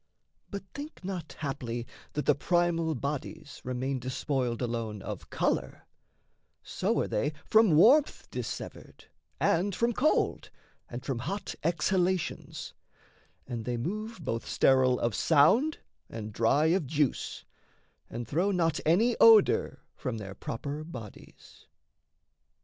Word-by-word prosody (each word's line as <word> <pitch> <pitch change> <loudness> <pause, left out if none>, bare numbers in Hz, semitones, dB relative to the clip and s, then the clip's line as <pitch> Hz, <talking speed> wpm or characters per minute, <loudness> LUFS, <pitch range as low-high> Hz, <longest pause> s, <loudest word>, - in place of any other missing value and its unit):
But 200 -1 -5
think 290 -5 -8
not 175 -7 -5
haply 120 -5 -3 0.3
that 150 - -2
the - - +5
primal 165 0 +1
bodies 140 +2 -5
Remain 130 +1 -2
despoiled 130 -1 -2
alone 115 -4 -3
of - - -7
colour: - - -1 0.8
so, - - -1
Are - - -1
they 145 +8 -1
from 215 -7 +5
warmth 270 - +5
dissevered - - -7 0.3
and 185 +3 +2
from 235 +1 +1
cold 300 +7 +1 0.4
And 120 +1 -7
from 135 -4 -2
hot 190 +11 -4
exhalations; 175 +2 -1 0.7
and 120 -3 -5
they 120 +1 -2
move, 215 - -4
Both 115 0 -3
sterile 130 -1 +3
of 120 -1 0
sound 190 - +4 0.3
and 110 -2 -7
dry 115 +8 +3
of 180 -7 0
juice; 145 -2 -1 0.6
and 120 0 -5
throw 170 +10 +1
Not 165 -5 +1
any 220 +10 +3
odour 225 -3 +5
from 130 -5 -4
their 100 -3 -7
proper 140 +9 -5
bodies. 120 -11 -12
150 Hz, 120 wpm, -29 LUFS, 125-185 Hz, 0.8 s, the